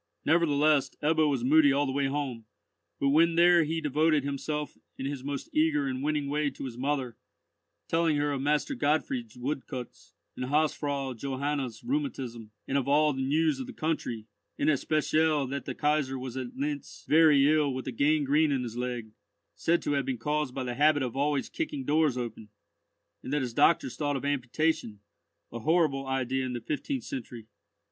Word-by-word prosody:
Nevertheless 150 -3 +3
Ebbo 155 0 +3
was 135 -4 -1
moody 145 +2 +5
all 140 +1 +2
the 135 - -2
way 140 0 0
home, 135 -5 -3 0.5
but 140 - +2
when 165 +3 +4
there 175 0 +6
he 160 +2 -1
devoted 155 0 +2
himself 145 +2 -3 0.2
in 135 - -5
his 140 -2 -4
most 140 -1 -4
eager 155 -2 +2
and 130 -1 -3
winning 150 0 -1
way 145 +1 0
to 135 - -8
his 125 -3 -6
mother, 130 -2 -2 0.7
telling 165 -2 +2
her 145 0 0
of 140 -2 -2
Master 150 - +1
Gottfried's 135 - -1
woodcuts, 130 -1 -6 0.2
and 125 - -3
Hausfrau 145 -1 0
Johanna's 135 0 -3
rheumatism, 135 - -3 0.2
and 140 - +1
of 135 - -4
all 150 +1 +4
the 135 - -3
news 150 +1 +1
of 130 - -5
the - - -8
country, 150 -8 -3 0.3
in - - +1
especial 155 0 +2
that 140 +2 -5
the - - -5
Kaisar 145 -3 0
was 130 -1 -6
at 130 -2 -5
Lintz, 145 +1 -4
very 150 -3 +6
ill 150 -2 +3
with 130 0 -5
a - - -2
gangrene 150 +3 +2
in 135 -2 0
his 115 -2 -6
leg, 120 -3 -4 0.4
said 170 +1 +1
to - - -1
have 140 -2 0
been 130 -2 -1
caused 150 +1 -2
by 130 -2 -3
his 120 -1 -4
habit 150 -1 +4
of 125 -1 -4
always 140 0 0
kicking 140 -4 -4
doors 150 -2 +2
open, 115 -3 -6 0.7
and - - -7
that 145 -2 +1
his 120 -2 -4
doctors 145 -1 +3
thought 145 -1 -1
of 135 - -4
amputation, 145 -3 -1 0.5
a 120 - -5
horrible 150 -1 +1
idea 130 0 -1
in 130 -1 -3
the 120 - -4
fifteenth 195 - -3
century. 120 - -7
140 Hz, 185 wpm, -28 LUFS, 130-155 Hz, 0.7 s, there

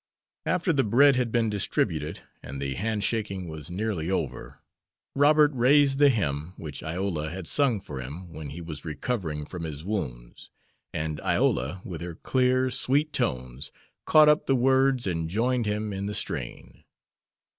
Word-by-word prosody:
After 180 -1 +1
the 135 -2 +3
bread 135 +6 +5
had 125 -2 0
been 115 -2 +1
distributed 100 -2 -1 0.2
and 70 +1 -7
the 70 -1 -2
handshaking 105 - -1
was 80 -1 -7
nearly 90 -3 -2
over, 95 - -3 0.6
Robert 150 +1 +5
raised 135 +2 +4
the 145 -1 +7
hymn 85 - -1
which 75 -4 -7
Iola 80 -1 -2
had 90 +1 -6
sung 130 - +2
for 70 -8 -7
him 80 +7 -8
when 75 -2 -7
he 80 +5 -7
was 80 -4 -7
recovering 80 - -3
from 90 +2 -7
his 75 -2 -6
wounds, 60 - -5 0.4
and 75 -1 -3
Iola, 75 +10 0
with 85 -3 -6
her 85 -1 -5
clear, 130 +4 +1
sweet 145 +5 +1
tones, 65 +1 -2 0.4
caught 155 -1 +7
up 150 +1 +4
the 135 - +3
words 130 0 +3
and 80 -3 -2
joined 120 +4 0
him 105 0 -2
in 100 +1 -3
the 105 - -2
strain. - - -4
100 Hz, 155 wpm, -27 LUFS, 80-125 Hz, 0.6 s, the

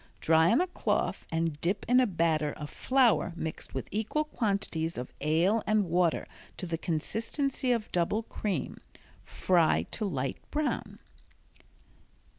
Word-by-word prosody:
Dry 160 +1 +4
on 235 - +4
a - - +2
cloth 360 - -1
and 165 -2 -1
dip 195 +4 0
in 250 +2 +5
a 255 - +4
batter 160 -5 +1
of 150 -1 -8
flour 255 -8 +2
mixed 160 -2 -6
with - - -3
equal 220 +9 0
quantities 200 - -2
of 125 +1 -6
ale 170 +9 +2
and 215 -2 +3
water 175 -1 +1 0.3
to - - -4
the 165 -2 -3
consistency 230 - -1
of 230 -3 -1
double 180 +6 +1
cream. 200 -7 -3 0.4
Fry 175 -3 +2
to 215 - -2
light 135 -8 -2
brown. 300 0 -2
180 Hz, 140 wpm, -29 LUFS, 160-225 Hz, 0.4 s, in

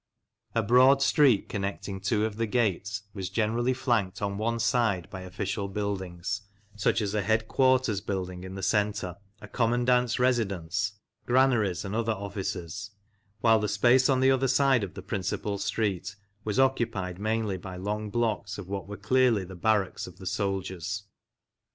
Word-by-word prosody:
A 115 - +2
broad 130 +5 +5
street 140 -9 +4
connecting 100 -1 -4
two 105 +2 +1
of 110 -1 -4
the 115 0 0
gates 105 -3 0
was 95 -4 -4
generally 115 +3 +1
flanked 120 -8 0
on 100 -1 -2
one 115 +2 0
side 115 -6 +1
by 95 - -6
official 100 +2 -3
buildings, 100 0 -3 0.3
such 105 +2 +1
as 100 -1 -2
a 105 - +1
headquarters 110 +1 +2
building 90 -3 -4
in 95 0 -7
the 95 - -6
centre, 100 -4 0 0.2
a - - -9
commandant's 120 0 +2
residence, 105 -6 0 0.3
granaries, 120 -8 +2
and 100 - -4
other 115 0 +1
offices; 100 -1 -5 0.5
while 110 -1 +5
the 105 - -1
space 125 +6 +4
on 130 -1 +3
the 135 0 +5
other 135 0 +2
side 130 -3 +3
of 95 - -6
the 95 - -7
principal 100 0 -2
street 100 -2 -1 0.3
was 105 +2 -1
occupied 115 -9 +1
mainly 110 -2 -1
by 95 0 -8
long 105 +3 -3
blocks 110 -3 -1
of 100 -3 -7
what 95 -2 -4
were 105 0 -7
clearly 120 -1 +3
the 95 +1 -9
barracks 100 +1 0
of 90 -1 -12
the 95 - -11
soldiers. 95 -1 -2
105 Hz, 160 wpm, -28 LUFS, 95-115 Hz, 0.5 s, broad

